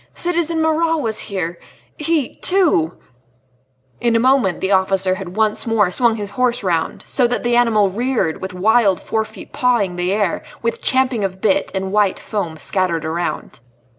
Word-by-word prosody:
Citizen 335 -2 0
Marat 325 +1 +2
was 225 -6 -2
here.... 175 -4 -4 0.4
He, 305 -4 -1
too 320 - +2 0.5
" 130 0 -40
In 235 -1 +2
a - - +4
moment 255 -7 +2
the 190 - -1
officer 190 -1 +2
had 185 -1 -7
once 220 +1 0
more 210 -5 +2
swung 235 +3 +2
his 205 -2 -5
horse 245 +1 0
round, 170 -4 -1
so 250 -3 +1
that 245 - -2
the 240 0 +1
animal 220 -5 +3
reared, 235 -6 -1
with 190 - -4
wild 200 +1 +3
forefeet 220 -1 -4
pawing 225 -8 +1
the 180 +1 0
air, 200 -3 0 0.2
with 230 - -2
champing 260 -4 +1
of 190 -1 -3
bit, 195 -1 +1
and 190 0 -2
white 205 -2 +2
foam 175 -7 -4
scattered 170 -1 -1
around. 170 -3 -3
210 Hz, 165 wpm, -19 LUFS, 185-245 Hz, 0.5 s, a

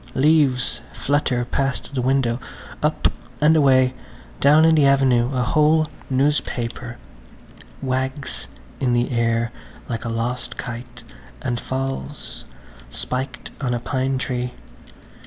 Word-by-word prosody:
Leaves 135 -4 +3
flutter 130 -4 0
past 135 +2 -2
the 130 - 0
window, 130 -2 +1 0.4
up - - +2 0.3
and 155 +2 +5
away; 130 -4 +5 0.5
down 150 +3 +6
in 165 - +6
the 155 -2 +5
avenue 135 -3 +4
a 130 -2 +1
whole 155 +4 +4 0.2
newspaper 130 -3 -1 0.9
wags 130 +2 -2 0.3
in 125 -2 +1
the 120 +2 +1
air 115 0 +1 0.4
like 115 -2 -3
a 115 - -3
lost 115 +2 -2
kite 120 0 -7 0.4
and 120 -2 -2
falls, 135 +2 -4 0.4
spiked 130 +1 -4
on 125 -2 +1
a - - -1
pine 130 +2 -1
tree. 125 -1 -2
130 Hz, 120 wpm, -22 LUFS, 120-140 Hz, 0.9 s, down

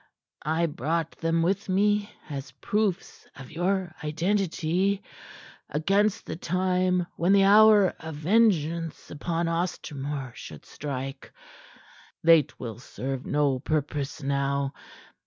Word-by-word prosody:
I 160 +2 +2
brought 160 +2 -1
them 165 0 +1
with 195 +3 0
me 205 +2 +2 0.2
as 140 -3 -6
proofs 200 - -2
of 130 -1 -11
your 180 +1 -1
identity, 185 +3 0 0.7
against 200 +8 +1
the - - -5
time 180 +1 +1
when 175 +4 +3
the 200 -1 +6
hour 205 -1 +7
of 160 -1 -7
vengeance 170 -3 +1
upon 165 +3 -2
Ostermore 145 -6 -3
should 75 -8 -10
strike. 135 -1 -6 0.9
They 165 -1 +7
twill 120 -5 -8
serve 130 +2 -5
no 145 -3 +1
purpose 145 -1 -2
now. 140 0 0
165 Hz, 110 wpm, -27 LUFS, 145-190 Hz, 0.9 s, hour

